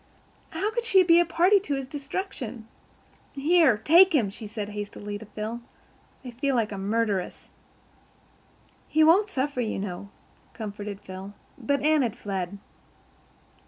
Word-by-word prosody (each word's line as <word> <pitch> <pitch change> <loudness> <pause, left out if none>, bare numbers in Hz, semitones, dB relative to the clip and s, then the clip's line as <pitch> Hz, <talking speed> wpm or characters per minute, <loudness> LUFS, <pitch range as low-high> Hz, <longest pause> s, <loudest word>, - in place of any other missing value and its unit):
How 390 +7 -2
could 475 +1 -2
she 390 -5 +5
be 340 -1 +6
a 345 - +4
party 350 +5 +4
to 300 -7 -2
this 270 -1 -4
destruction? 275 - -6 0.7
"Here, 295 -3 +4
take 340 - +6
him," 220 -9 +2
she 215 +2 -9
said 210 -1 -5
hastily 205 0 -6
to 220 - -11
Phil. 220 +3 -5 0.6
"I 250 - -6
feel 270 +3 -1
like 225 -3 0
a 200 - -5
murderess." 205 -1 -2 1.4
"He 315 - +3
won't 375 +7 +5
suffer, 275 -5 -1
you 225 - -2
know," 195 0 -5 0.4
comforted 205 -2 -6
Phil, 190 +1 -9 0.2
but 280 +3 -1
Anne 310 0 +4
had 235 -5 -2
fled. 195 -1 -4
245 Hz, 145 wpm, -26 LUFS, 205-320 Hz, 1.4 s, be